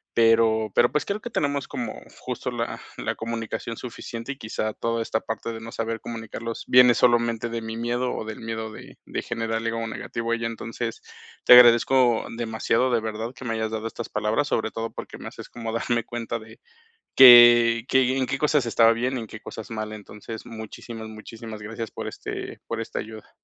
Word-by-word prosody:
Pero 115 -1 +4
pero 120 - +5
pues, 150 - 0
creo 200 +1 -2
que 240 - -6
tenemos 145 -7 -1
como 120 - -5 0.2
justo - - -4
la - - -3 0.2
la - - -2
comunicación 115 0 -4
suficiente, 115 +1 -7
y - - -19
quizá 110 -1 -3
toda 115 +1 -2
esta 110 0 -1
parte 110 +1 -4
de 110 - -7
no 115 +1 -8
saber 115 0 -3
comunicarlos 115 0 -6
viene 125 -1 +7
solamente 120 -1 +2
de 115 0 -4
mi 110 0 -6
miedo 120 +2 -1
o - - -4
del 110 0 -7
miedo 110 -1 -4
de - - -12
de - - -4
generarle 115 0 -2
algo 115 0 -3
negativo 115 +1 -4
a - - +3
ella. 115 0 -2
Entonces, 115 0 -5 0.4
te - - +9
agradezco 120 0 +6
demasiado, 115 +2 0
de 115 - +2
verdad, 110 +2 -4
que 130 - -10
me 115 -2 -1
hayas 110 0 -2
dado 110 0 -3
estas 115 +1 -6
palabras, 105 +7 0
sobre 110 -1 0
todo 115 0 -5 0.3
me - - -8
haces - - -11
como 115 -1 -6
darme 120 0 0
cuenta 120 -1 -4
de 110 0 -14 0.6
que 120 -2 +9
que 130 0 +3
en 130 - +1
qué 135 - -2
cosas 150 -3 +2
estaba 115 0 +5
bien 125 +3 -1
y - - -3
en - - -7
qué 110 - -9
cosas 110 +1 -9
mal. 110 -1 -4
Entonces, 105 +1 -9
muchísimas, 110 0 -8
muchísimas 110 0 -9
gracias 115 +1 -6
por - - -6
este - - -7
por 115 0 -3
esta 115 - -4
ayuda. 110 -1 -10
115 Hz, 195 wpm, -25 LUFS, 110-120 Hz, 0.6 s, te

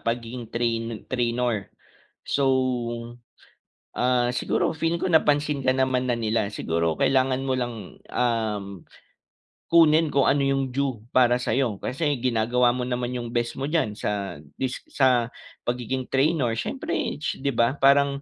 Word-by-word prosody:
pagiging 115 0 -4
train 115 -2 -2
trainor. 120 -4 -1 0.6
So, 140 - 0 1.5
ah, 125 -1 +2
siguro - - 0
feeling 165 +2 -1
ko - - -1
napansin 150 -4 +2
ka 130 - +3
naman 130 -1 +1
na 120 - 0
nila, 110 -2 0
siguro 85 -1 -1
kailangan 130 -1 +2
mo 130 - +1
lang, 120 -1 -2 0.4
um, 110 -4 0 1.1
kunin 160 -2 +5
kung 140 -1 +4
ano 140 0 +2
yung 135 0 +1
due 130 -4 -2
para 125 -1 +3
sa'yo. 120 -5 0
Kasi 140 +6 -2 0.2
ginagawa 120 0 +2
mo 125 0 -1
naman 125 -1 -2
yung 120 -1 -5
best 120 0 -1
mo 135 - -2
diyan 145 -9 0
sa 100 -7 -3 0.2
dis 130 - -3
sa 125 -3 +2 0.3
pagiging 125 +1 -2
trainor 135 -3 +1
siyempre, 275 - -3 0.2
'di 145 -2 -2
ba? 115 +3 +3
Parang 140 0 +4
125 Hz, 140 wpm, -25 LUFS, 115-135 Hz, 1.5 s, kunin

